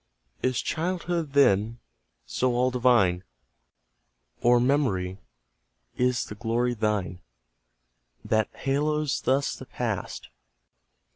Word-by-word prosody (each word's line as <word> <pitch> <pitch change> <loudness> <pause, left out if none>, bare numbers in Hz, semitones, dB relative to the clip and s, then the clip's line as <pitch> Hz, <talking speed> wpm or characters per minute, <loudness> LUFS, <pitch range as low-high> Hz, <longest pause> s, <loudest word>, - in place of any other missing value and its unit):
Is 130 -2 0
childhood, 170 -2 -2
then, 115 -5 +3 0.5
so 125 -1 0
all 125 +1 +2
divine? 120 -8 +3 1.2
Or 120 0 +5
Memory, 105 -9 0 0.8
is 125 -2 +1
the - - -8
glory 115 +3 -1
thine, 105 -5 -2 1.0
That 110 -1 +1
haloes 150 +2 -1
thus 135 +2 +1
the 130 - -11
past? 110 -6 -4
125 Hz, 90 wpm, -26 LUFS, 105-140 Hz, 1.2 s, Or